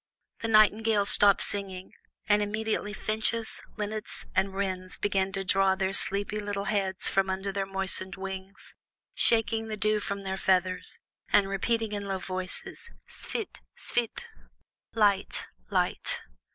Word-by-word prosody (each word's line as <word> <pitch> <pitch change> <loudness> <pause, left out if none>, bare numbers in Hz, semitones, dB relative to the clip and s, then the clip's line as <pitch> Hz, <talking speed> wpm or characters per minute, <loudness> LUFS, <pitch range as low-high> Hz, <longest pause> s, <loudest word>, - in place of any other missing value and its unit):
The 225 - -3
nightingales 215 -1 +4
stopped 200 -1 +8
singing, 190 -2 -4 0.3
and 210 0 +4
immediately 215 0 -1
finches, 220 +2 -1 0.2
linnets, 215 0 -4
and 190 +1 +2
wrens 185 -1 -3
began 195 -1 0
to 195 - -2
draw 190 0 +3
their 190 0 -1
sleepy 200 +2 +1
little 205 -1 -3
heads 195 -3 -1
from 195 0 +2
under 190 +1 -2
their 195 0 -2
moistened 190 -1 0
wings, 190 0 -8 0.4
shaking 225 -1 +2
the 215 -1 -4
dew 215 0 +2
from 200 -1 -4
their 190 -1 -3
feathers, 185 -1 +1 0.3
and 200 -1 +5
repeating 220 +3 0
in 205 -1 -3
low 195 -1 -1
voices, 185 - -4 0.2
"Svit! 440 - -4 0.2
svit!" 240 - -1 0.7
("Light! 205 -3 +2 0.2
light!"). - - 0
200 Hz, 135 wpm, -28 LUFS, 190-215 Hz, 0.7 s, stopped